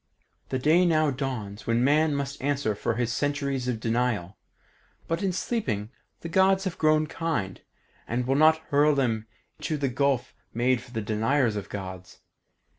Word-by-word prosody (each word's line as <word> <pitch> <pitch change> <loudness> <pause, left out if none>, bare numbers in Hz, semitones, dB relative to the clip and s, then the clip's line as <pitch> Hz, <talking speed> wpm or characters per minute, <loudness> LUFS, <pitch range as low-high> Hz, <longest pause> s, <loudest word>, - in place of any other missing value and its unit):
The 130 - 0
day 155 +7 +4
now 155 -4 +3
dawns 125 -7 -5
when 115 +1 +2
man 150 +2 +3
must 140 0 -4
answer 140 -5 0
for 105 +2 -2
his 120 0 -1
centuries 140 -3 -1
of 120 -3 -1
denial, 115 -5 -1 0.7
but 165 +1 -1
in 195 -2 +1
sleeping 125 - -2 0.3
the - - -5
Gods 190 +2 +3
have 185 -3 -4
grown 155 0 +3
kind, 150 - -3 0.5
and 120 +1 -1
will 130 - +1
not 155 +3 +5
hurl 145 +1 +4
him 115 -5 0 0.3
to 155 - -2
the 140 -2 0
gulf 135 0 0 0.2
made 125 +1 +2
for 120 -2 -6
deniers 110 +3 +1
of 105 - -5
Gods. 95 -1 -7
135 Hz, 160 wpm, -26 LUFS, 115-155 Hz, 0.7 s, not